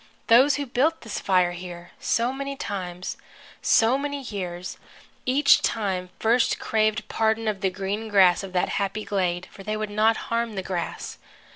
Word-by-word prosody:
Those 255 +5 +6
who 285 - -2
built 275 +6 +1
this 225 -3 -5
fire 180 -2 +2
here, 175 -1 -9
so 235 +3 +1
many 275 +1 -4
times, 185 -6 -5 0.4
so 230 +4 +4
many 285 0 -3
years, 180 -5 -5 0.5
each 280 +3 +5
time 190 -4 -1
first 230 +2 +2
craved 215 0 0
pardon 220 0 0
of 205 -2 -1
the 190 - +2
green 195 +4 -4
grass 190 -4 +5
of 195 -1 -7
that 180 - +1
happy 200 +2 -2
glade, 180 -3 -1
for 195 - -12
they 215 +2 -3
would 215 -1 -4
not 220 +2 +3
harm 230 -1 0
the 190 - -3
grass. 180 -3 -4
215 Hz, 165 wpm, -25 LUFS, 185-230 Hz, 0.5 s, Those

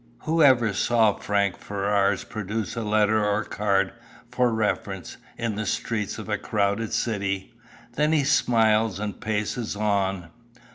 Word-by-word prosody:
Who 165 +1 +1
ever 120 -7 +5
saw 110 0 +3
Frank 100 -2 -1
Ferrars 100 0 0
produce 105 -1 -4
a 115 - -2
letter 105 0 +2
or 105 +1 +1
card, 100 -2 0 0.4
for 125 -1 +2
reference, 105 -4 -2 0.2
in 115 -2 -2
the 110 - -2
streets 105 -1 -2
of - - -7
a - - -1
crowded 100 +2 -1
city? 100 -4 -2 0.4
Then 150 +4 +1
he 155 -3 +3
smiles 110 -6 +2
and 105 -1 -5
paces 110 +1 -2
on. 100 -4 -1
105 Hz, 140 wpm, -25 LUFS, 100-115 Hz, 0.4 s, ever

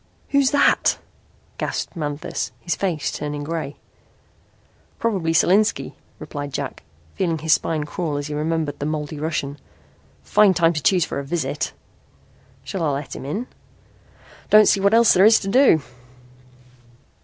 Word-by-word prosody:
"Who's 280 -2 +3
that?" 285 0 +3 0.6
gasped - - -3
Manthis, 150 -2 -4
his 170 -3 -2
face 170 -4 -2
turning 145 0 -4
grey. 155 -2 -4 1.2
"Probably 195 -8 -1
Solinski," 195 +6 +2 0.2
replied 145 -1 -6
Jack, 140 -2 -4 0.3
feeling 170 -4 -1
his 160 +1 +2
spine 155 -2 0
crawl 150 0 -3
as 145 - -4
he 150 - -5
remembered 155 -1 -2
the 145 - -2
moldy 150 -1 -4
Russian. 145 -2 -3 0.6
"Fine 205 -3 +4
time 165 0 +3
he 155 - -2
chose 175 +4 +3
for - - -4
a - - -4
visit." 160 +4 -3 0.9
"Shall 190 - -5
I 160 - +1
let 140 0 -4
him - - -8
in?" 205 - -3 1.0
"Don't 215 -1 +7
see 200 - +4
what 200 +3 +3
else 230 -1 +6
there 185 - +4
is 220 +2 +7
to 195 - -5
do." 195 - +4
160 Hz, 145 wpm, -22 LUFS, 145-195 Hz, 1.2 s, Don't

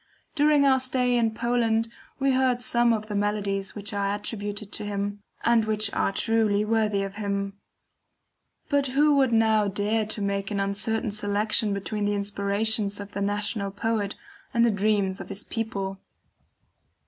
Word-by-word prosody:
During 295 -1 +4
our 265 -1 +5
stay 255 -1 +1
in 230 -2 +2
Poland 230 -1 +1 0.3
we 275 0 +2
heard 255 -1 +2
some 240 -1 +3
of 215 -2 0
the 215 - -6
melodies 200 -1 -1
which 205 -1 -5
are 200 0 0
attributed 205 0 -5
to - - -2
him, 205 0 -3 0.2
and 235 -2 +3
which 215 -1 0
are - - +1
truly 215 -1 +1
worthy 215 -2 +1
of 195 +1 -6
him; 200 -1 -2 1.1
but 285 -2 +1
who 295 0 +5
would 265 -3 +3
now 220 -2 +3
dare 210 +2 0
to 215 - -3
make 200 0 -1
an 205 -2 -2
uncertain 205 +3 0
selection 210 +1 +1
between 205 +1 -2
the 205 0 +1
inspirations 200 +1 +1
of 200 0 -7
the 200 - -4
national 205 0 -1
poet, 205 0 -2 0.4
and 235 0 +5
the 235 - +3
dreams 200 -2 0
of - - -9
his 200 +1 -5
people? 195 -4 -4
210 Hz, 160 wpm, -26 LUFS, 200-225 Hz, 1.1 s, our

